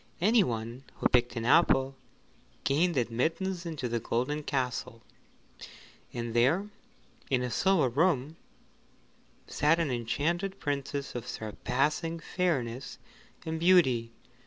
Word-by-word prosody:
Anyone 125 - +1
who - - +2
picked 120 -1 +2
an 115 -1 -3
apple 135 -1 +4 0.7
gained 160 +3 +2
admittance 165 +10 -1
into 155 -6 -3
the 120 0 -1
golden 130 +7 -1
castle, 125 -5 -3 1.1
and 120 -1 -4
there 155 - +2 0.6
in 130 -2 +1
a 125 - -3
silver 190 -4 +3
room 150 +2 +1 1.1
sat 150 +3 +2
an 165 -5 0
enchanted 160 - -1
Princess 140 -1 -3
of 120 - -6
surpassing 140 - -2
fairness 135 -9 -2 0.5
and 160 0 -3
beauty. 130 -10 +4
140 Hz, 110 wpm, -29 LUFS, 120-165 Hz, 1.1 s, apple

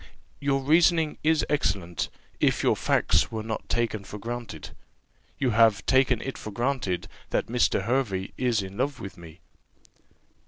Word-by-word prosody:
"Your 140 -1 +1
reasoning 160 +1 +3
is 155 0 +3
excellent, 90 - -1 0.3
if - - +2
your - - +4
facts - - +2
were 110 -1 -3
not 110 -1 -5
taken 115 -3 0
for 100 +2 -8
granted. 115 -7 -6 0.7
You 130 -3 +1
have 110 -2 +4
taken 130 -3 +3
it 135 - -5
for - - -6
granted, 120 -4 -1 0.2
that - - 0
Mr. 120 -4 +1
Hervey 105 -5 -1
is 120 -5 +1
in 95 +1 -8
love 135 +3 -1
with 95 - -7
me." 85 0 -13
115 Hz, 150 wpm, -26 LUFS, 100-135 Hz, 0.7 s, your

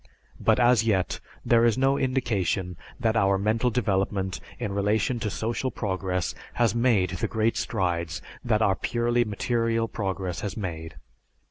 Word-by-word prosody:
But, - - +3
as 120 -2 +5
yet, 100 -5 0 0.3
there 115 -1 +4
is 120 0 +3
no 135 +1 +3
indication 100 -9 0 0.2
that 115 -2 +1
our 100 -2 +3
mental 110 +5 +1
development 95 -4 0 0.2
in 105 - -3
relation 105 +4 +1
to 110 - -2
social 115 +5 -2
progress 95 -5 -2 0.2
has 120 -2 +2
made 115 -7 +2
the 90 - -2
great 110 0 +1
strides 85 -5 -1 0.2
that 110 -2 +2
our 95 -2 +3
purely 120 +3 +1
material 115 +1 0
progress 95 -4 -3
has 100 - -4
made. 80 -5 -5
105 Hz, 145 wpm, -26 LUFS, 95-120 Hz, 0.3 s, as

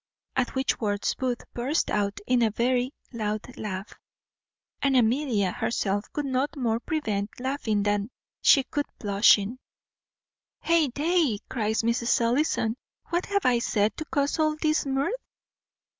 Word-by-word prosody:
At 260 0 0
which 265 0 0
words 205 -2 0
Booth 250 -2 -2
burst 265 +7 0
out 200 -1 0
into 245 -2 +3
a - - 0
very 245 +3 +1 0.2
loud 215 +1 -3
laugh; 195 -1 -5 0.9
and 275 -2 +3
Amelia 230 -5 +2
herself 205 -1 -1
could 295 - -3
no 265 +1 +1
more 230 -3 0
prevent 220 -9 -2
laughing 245 -6 -1
than 205 +1 0 0.3
she 275 - +6
could 290 +2 -3
blushing. 205 +2 +3 1.0
"Heyday!" 320 - +2
cries 220 -2 -1
Mrs. 235 +1 +2
Ellison; 235 -1 +1 0.3
"what 345 +1 -1
have 400 -1 0
I 245 -1 +4
said 215 -2 +1
to 310 - -4
cause 285 +1 0
all 310 -1 +2
this 310 -1 0
mirth?" 270 - 0
245 Hz, 135 wpm, -26 LUFS, 215-280 Hz, 1.0 s, she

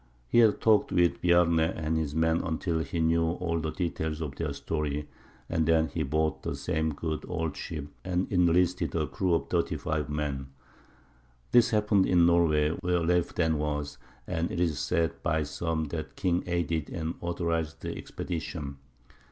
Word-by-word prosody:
He 120 - +4
had 110 -3 +5
talked 110 -2 +3
with 85 -1 +2
Bjarne 85 -2 +4
and 80 0 0
his 80 -2 -1
men 80 +1 +2
until 80 0 -1
he 80 +1 -3
knew 80 0 +2
all 85 -2 -2
the 80 0 -2
details 80 -3 -2
of 75 -4 -4
their 75 0 -3
story, 75 0 -3 0.4
and 80 -2 0
then 80 -1 +3
he 80 +3 -3
bought 80 +1 0
the - - -3
same 80 +2 -1
good 80 0 -3
old 80 -4 -2
ship, 75 -3 -5 0.2
and 90 0 -1
enlisted 90 -1 +2
a 80 -2 +1
crew 90 +2 0
of - - -2
thirty - - 0
five 75 -2 -2
men. 75 -3 -2 1.0
This 120 -1 +6
happened 105 -3 +3
in 85 -2 +5
Norway, 80 -3 +4
where 90 -1 +1
Leif 90 +1 +1
then 80 -3 +1
was, 75 -1 -3 0.3
and 85 +1 -1
it - - -3
is 85 -5 +1
said 85 -2 0
by 80 0 +1
some 80 +2 -2
that 80 0 -5
the - - -15
king 90 -2 +1
aided 85 -3 -1
and 80 0 -3
authorized 85 -2 -2
the - - -3
expedition. 80 -4 -5
80 Hz, 175 wpm, -28 LUFS, 80-85 Hz, 1.0 s, This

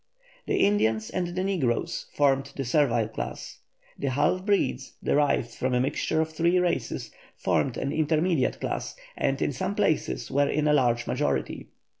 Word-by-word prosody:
The - - +1
Indians 110 - +2
and 180 -1 -1
the 180 +2 -3
negroes 155 - -1
formed 140 -1 +2
the 135 - -3
servile 120 -4 +2
class. 110 - -6 0.4
The 140 - -1
half 145 +7 +1
breeds, 135 -10 0
derived 140 -5 +2
from 125 +2 -1
a - - +3
mixture 145 +4 0
of 160 0 0
three 170 +3 +2
races, 180 -1 -1 0.2
formed 130 - 0
an 140 - -2
intermediate 155 -1 +1
class, - - -3 0.2
and - - 0
in - - 0
some - - -2
places - - 0
were 140 +1 +2
in 150 +1 +1
a 150 - +4
large 120 -4 +2
majority. - - -1
145 Hz, 160 wpm, -27 LUFS, 125-165 Hz, 0.4 s, a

